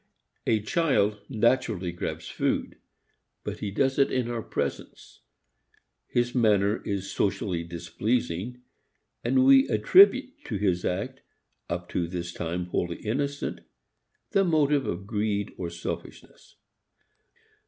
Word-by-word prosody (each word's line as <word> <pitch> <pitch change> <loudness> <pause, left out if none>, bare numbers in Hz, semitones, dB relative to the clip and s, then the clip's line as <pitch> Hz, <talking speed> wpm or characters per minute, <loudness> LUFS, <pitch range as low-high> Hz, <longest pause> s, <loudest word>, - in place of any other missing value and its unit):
A 110 -2 +3
child 110 - +1
naturally 110 -7 +1
grabs 85 - -5
food. - - -2 0.6
But - - -5
he 105 - -3
does 130 +7 +1
it 140 - +4
in 125 -2 0
our 115 -1 -2
presence. - - -5 0.9
His 120 0 0
manner 105 -4 +3
is 100 -1 -2
socially 95 -4 -1
displeasing 90 +6 -2 0.6
and 130 +2 +3
we 135 0 +7
attribute 200 - +5
to 110 - -3
his 95 -3 +1
act, 125 +9 -3 0.5
up 85 0 -3
to 85 - -1
this 85 0 -5
time 85 +1 -3
wholly 85 -1 -2
innocent, 140 +6 -2 0.7
the 195 - +4
motive 150 -5 +2
of 90 +3 -3
greed 105 -1 -1
or 85 -2 -4
selfishness. 85 0 -8
105 Hz, 120 wpm, -27 LUFS, 90-130 Hz, 0.9 s, we